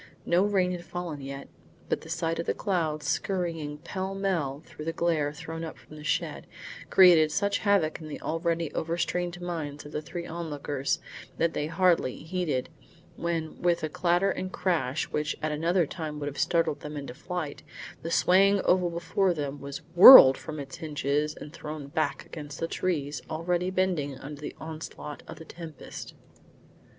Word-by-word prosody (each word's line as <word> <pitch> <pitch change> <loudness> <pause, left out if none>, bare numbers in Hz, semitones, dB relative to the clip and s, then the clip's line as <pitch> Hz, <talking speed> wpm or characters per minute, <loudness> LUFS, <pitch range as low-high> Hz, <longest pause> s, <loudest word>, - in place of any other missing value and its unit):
No 180 +3 +3
rain 190 -3 +2
had 175 -1 -5
fallen 175 -5 -5
yet, 140 0 -7 0.4
but - - -1
the - - -12
sight 165 0 -1
of 170 - -3
the - - +1
clouds 160 -7 -1
skurrying 165 -6 -2
pell 190 +5 -4
mell 165 -8 -1
through 150 - -9
the 165 - 0
glare 160 -4 +1
thrown 160 +2 -7
up 160 - -6
from 120 +5 -15
the 150 - -10
shed, 155 - -2 0.4
created 170 -5 +7
such 200 +3 +1
havoc 195 -7 +2
in 155 - -8
the 150 - -6
already 165 0 -1
overstrained 175 +1 -2
minds 160 -5 -5
of 145 - -9
the 150 - -3
three 170 +3 -6
onlookers, 145 -5 -2 0.4
that 165 0 +1
they 150 - -1
hardly 165 -6 +2
heeded, 160 -6 -2 0.5
when 165 -2 -3
with 175 -2 +2
a 155 - -1
clatter 175 +4 +2
and 185 0 -4
crash 165 -8 0
which 150 0 -1
at 155 - -2
another 165 +3 +2
time 155 -1 -5
would 145 - -4
have 145 -1 -5
startled 165 -4 +1
them 150 0 -7
into 140 -3 -6
flight, 160 +1 -5 0.4
the 165 - -4
swaying 195 +4 +4
oval 180 -1 +3
before 175 +2 0
them 145 -2 -4
was 140 0 -7
whirled 175 - +12
from 155 -1 -7
its 140 +4 -7
hinges 150 -1 -1
and 150 - -10
thrown 150 -1 -6
back 140 0 -1
against 145 -2 -8
the 165 - -1
trees 150 -6 -2
already 175 +3 -1
bending 180 -8 0
under 145 +2 -9
the 150 - -6
onslaught 155 -2 -7
of - - -9
the 160 - -10
tempest. 160 -4 -9
160 Hz, 175 wpm, -28 LUFS, 150-175 Hz, 0.5 s, whirled